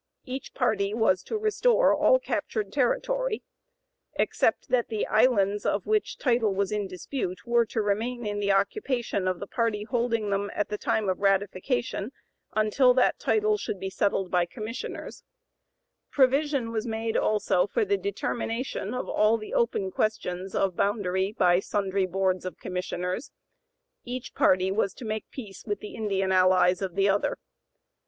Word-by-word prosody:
Each 265 +1 -6
party 210 -5 +1
was 190 -5 +2
to 445 - -2
restore 465 +3 +3
all - - +5
captured 445 -3 -3
territory, - - 0 0.7
except - - +1
that 250 -2 +2
the 220 -2 -2
islands 205 -4 +3
of - - 0
which 430 -1 0
the - - -17
title 235 -6 +2
was 200 0 0
in 210 -2 -1
dispute 185 0 -5
were 235 -1 +3
to 220 0 -1
remain 225 +4 -1
in 205 0 -2
the 200 -1 +1
occupation 235 - 0
of 185 -1 -1
the - - -5
party 220 -1 -1
holding 230 -2 -1
them 200 +1 0
at 205 - -1
the 210 - -2
time 215 -2 0
of 185 - 0
ratification 200 +4 0 0.4
until 230 +4 +4
that 255 - +3
title 430 0 +2
should 200 - -4
be 190 +1 -4
settled 195 -1 0
by 175 -1 +2
commissioners; 225 +4 -7 0.9
provision 275 -2 +2
was 225 +1 -2
made 225 0 -2
also 205 -3 +2
for 435 - 0
the 405 0 +2
determination 250 - -3
of 250 - -3
all 215 +2 +3
the 215 - -8
open 200 -5 0
questions 190 -3 -2
of 190 -3 +1
boundary 195 -2 0
by 180 -5 +3
sundry 195 -1 -1
boards 185 0 0
of 185 - -6
commissioners; 180 +4 -4 0.7
each 250 0 -6
party 185 +1 +3
was 195 -1 0
to 255 - -9
make 215 0 -4
peace 210 -8 -9
with 205 -1 -2
the 210 - -9
Indian 195 -3 -1
allies 185 0 +4
of 185 -3 -3
the 195 0 +3
other. 200 +1 +1
210 Hz, 160 wpm, -27 LUFS, 195-245 Hz, 0.9 s, all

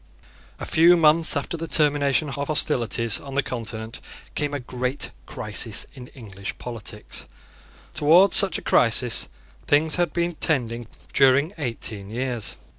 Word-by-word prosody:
A - - -5
few 170 +2 +5
months 160 -1 +4
after 145 - -4
the 165 +1 -5
termination 145 -2 +2
of 140 +1 -4
hostilities 115 -6 +1
on 135 -1 -9
the 140 - +1
Continent 115 -2 -6 0.3
came 145 -1 -2
a 145 - -3
great 125 +2 -3 0.2
crisis 105 -1 -1
in 125 -3 -11
English 100 -6 -8
politics. 115 -3 -7 0.7
Towards 170 +7 +5
such 195 -2 +6
a - - -10
crisis 120 0 +2 0.4
things 155 +3 +2
had 175 -1 0
been 170 0 -1
tending 120 -8 -2 0.3
during 140 +5 +3
eighteen 110 -6 -4
years. 120 -1 -3
135 Hz, 135 wpm, -23 LUFS, 115-155 Hz, 0.7 s, such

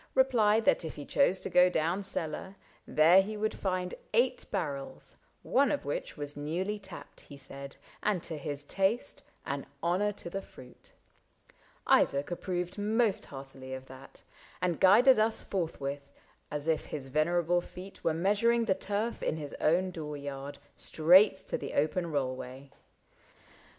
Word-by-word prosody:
Replied 225 -5 +4
that - - +3
if 160 - -6
he 145 - -7
chose 275 -10 +3
to - - -4
go 180 0 +6
down 170 +3 0
cellar. 190 0 -4 0.3
There 165 +5 +6
he 210 +2 -5
would 215 +1 -1
find 185 -2 -2 0.2
eight 245 +3 +2
barrels 145 -9 -4 0.2
— - - -41 0.2
one 280 -1 +4
of 290 - -2
which 145 - -4
Was 145 0 -5
newly 180 +8 -2
tapped, 190 -2 -10
he 140 - -13
said, 140 0 -9 0.3
and 200 -5 0
to 165 - -5
his 145 -1 -4
taste 195 - -1 0.2
An 140 0 -4 0.2
honor 185 +5 +2
to - - -9
the 195 +3 -4
fruit. 125 -8 -15 0.9
Isaac 140 +4 +3
approved 180 +1 -3
Most 215 0 +1
heartily 135 -1 -8
of 130 0 -9
that, 130 0 -13 0.4
and 175 -2 0
guided 215 +6 +7
us 220 +1 +1
Forthwith, 140 -6 -4 0.4
as 150 +1 -4
if 160 -1 +1
his 135 -3 -5
venerable 175 +4 +2
feet 185 +3 -11
Were 160 - +1
measuring 210 +7 +2
the 200 - +3
turf 205 +4 -2
in 155 - -1
his 145 -2 -6
own 180 +4 +2
door 150 -4 -6
yard. 140 0 -6 0.2
Straight 185 +6 +5
to - - -3
the - - -6
open 165 +4 +1
rollway. 130 -1 -4
175 Hz, 155 wpm, -30 LUFS, 145-200 Hz, 0.9 s, guided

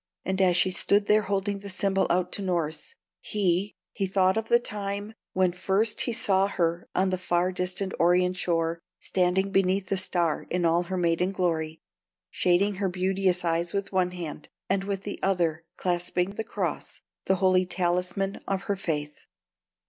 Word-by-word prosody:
And 190 0 0
as 180 -2 +4
she 185 +1 +3
stood 200 +2 +2
there 210 +1 +4
holding 200 0 -1
the 200 0 -8
symbol 195 0 +1
out 180 +1 +1
to - - -4
Norss, 175 - -2 0.2
he 195 -1 0 0.2
he 195 -2 -1
thought 190 0 +3
of 225 0 -2
the 235 - +6
time 205 -2 -4 0.2
when 185 -1 +3
first 190 +5 0
he - - 0
saw 195 -4 +3
her 170 -3 -1
on 190 +1 +2
the 185 - -1
far 180 0 +1
distant 185 +1 -2
Orient 180 +1 +3
shore, 165 -2 0 0.2
standing 190 +1 +1
beneath 190 0 +1
the 195 - +1
Star 175 -4 0
in 175 -1 0
all 165 +1 +3
her 185 +1 -4
maidenly 175 +2 +1
glory, 160 -3 -1 0.5
shading 185 +3 +2
her 195 - +1
beauteous 185 0 0
eyes 170 +1 0
with 200 0 -2
one 185 -2 +2
hand, 170 -4 -7 0.2
and 195 0 0
with 195 -1 -3
the 205 - -5
other 170 -4 0
clasping 180 +1 0
the 215 +2 -4
cross, 225 - -4 0.2
the 190 - +3
holy 185 -1 +3
talisman 180 +2 -1
of 195 0 -1
her 200 - -1
faith. 150 -5 -4
185 Hz, 170 wpm, -27 LUFS, 175-195 Hz, 0.5 s, the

